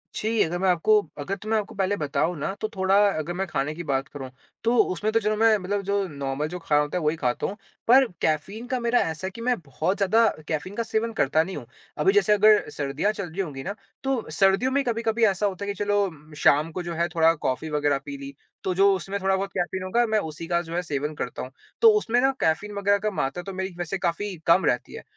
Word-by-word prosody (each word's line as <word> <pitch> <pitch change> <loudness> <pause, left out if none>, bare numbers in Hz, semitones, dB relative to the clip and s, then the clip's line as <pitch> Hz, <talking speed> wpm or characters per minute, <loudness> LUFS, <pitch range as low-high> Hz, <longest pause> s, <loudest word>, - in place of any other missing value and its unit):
छी, 220 0 0
अगर 170 +2 -2
मैं 190 0 +2
आपको 180 +5 +4 0.2
अगर 185 +7 -3
तो 215 - -9
मैं 220 - +3
आपको 210 - -4
पहले 195 +1 0
बताऊँ 155 +3 0
ना 175 +7 -2
तो 215 - 0
थोड़ा 190 0 +2 0.2
अगर 155 +3 -3
मैं 190 +2 -2
खाने 145 -2 -2
की 170 - -6
बात 135 -2 -1
करूँ 140 -4 -8 0.3
तो 230 +1 +2 0.2
उसमें 210 +4 -1
तो 225 - +4
चलो 215 -1 0
मैं 225 0 +5
मतलब 200 +1 -2
जो 200 0 0
नॉर्मल 140 -1 -3
जो 180 +3 -6
खाना 150 -3 +2
होता 150 +4 -2
है 175 - -2
वही 150 +1 +1
खाता 125 -5 -1
हूँ 205 - -6 0.3
पर 260 +3 +7 0.2
कैफ़ीन 195 +10 -1
का 255 0 -1
मेरा 235 0 +2
ऐसा 165 +3 -2
है - - -5
कि 230 - -8
मैं 250 +1 +2
बहुत 160 +5 -2
ज़्यादा 220 +3 +4 0.2
कैफ़ीन 165 +6 -3
का 230 - -1
सेवन 225 +1 -1
करता 155 -3 +2
नहीं 185 +2 -6
हूँ। 130 - -8 0.3
अभी 385 - +4
जैसे 415 - +4
अगर 210 -2 +5
सर्दियाँ 145 +8 -1
चल 200 -4 -5
रही 175 +5 -3
होंगी 140 -7 -5
ना 200 - -3 0.3
तो 270 -7 -1
सर्दियों 195 +9 +3
में 280 +1 +2
कभी-कभी 230 -1 0
ऐसा 200 0 +1
होता 200 0 -2
है - - -7
कि - - -3
चलो 190 -7 -1
शाम 150 +2 +3
को 180 +2 -4
जो 170 0 -4
है 170 +1 +1
थोड़ा 165 0 +5
कॉफी 150 0 -3
वग़ैरह 145 -2 +1
पी 140 -1 -6
ली। 140 0 -8 0.3
तो 185 - 0
जो 200 +2 +5
उसमें 195 +2 -4
थोड़ा 190 0 +2
बहुत 195 +1 -2
कैफ़ीन 185 +1 -2
होगा 235 +6 +2
मैं 220 -1 +2
उसी 160 -2 -6
का 170 0 +1
जो 165 -1 -7
है 175 - +1
सेवन 150 -2 -3
करता 125 - -5
हूँ। 130 - -7 0.3
तो 460 - +8
उसमें 245 - +1
ना 270 +1 +4
कैफ़ीन 175 +6 0
वग़ैरह 200 0 +3
का 215 - +1
मात्रा 175 -1 -2
तो 195 +1 -7
मेरी 190 0 -4
वैसे 175 +2 -3
काफ़ी 190 +2 -2
कम 170 +3 +5
रहती 125 - 0
है। - - -8
185 Hz, 250 wpm, -25 LUFS, 155-210 Hz, 0.3 s, तो